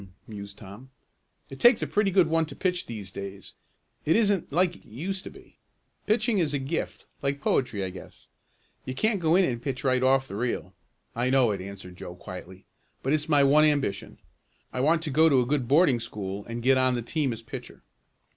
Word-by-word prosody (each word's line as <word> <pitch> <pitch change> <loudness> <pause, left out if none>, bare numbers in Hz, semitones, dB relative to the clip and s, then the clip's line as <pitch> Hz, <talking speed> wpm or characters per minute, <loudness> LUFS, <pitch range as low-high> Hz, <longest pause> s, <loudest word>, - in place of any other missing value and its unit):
mused 100 -2 -9
Tom. 105 +6 -12 0.6
"It 135 - -9
takes 240 -1 +6
a - - +1
pretty 205 -1 +1
good 185 -2 +4
one 160 0 +1
to - - -10
pitch 180 -2 -1
these 105 -5 -6
days. 100 -1 -8 0.5
It 160 - +2
isn't 205 -8 +2
like 175 +3 +2
it - - -17
used 180 - -5
to - - -6
be. - - -17 0.5
Pitching 215 -1 +2
is 150 -4 +1
a - - +2
gift, 140 +5 -4 0.2
like 140 0 -1
poetry 115 -7 0
I 95 - -3
guess. 95 - -12 0.6
You 130 - -5
can't 215 - +1
go 165 -1 +3
in 190 0 +5
and 120 -5 -2
pitch 130 0 -4
right 130 -2 +2
off 135 +1 +3
the 100 - -7
reel." 110 -5 -3 0.4
"I 120 +2 +1
know 130 -4 +4
it," 100 -2 -3
answered 95 -2 -9
Joe 90 - -8
quietly. 90 +1 -10 0.4
"But 135 - +1
it's 155 +1 0
my 145 -2 +5
one 145 +3 +5
ambition. 145 -9 0 0.6
I 125 - -3
want 160 +5 +2
to 155 - -3
go 160 +4 +5
to 135 -4 +4
a 125 - +2
good 135 -1 0
boarding 140 -3 +4
school 100 -3 -5
and 115 0 -5
get 130 +1 +4
on 130 -1 +2
the 120 - -3
team 145 +2 0
as 115 0 -6
pitcher." - - -9
135 Hz, 210 wpm, -27 LUFS, 110-160 Hz, 0.6 s, takes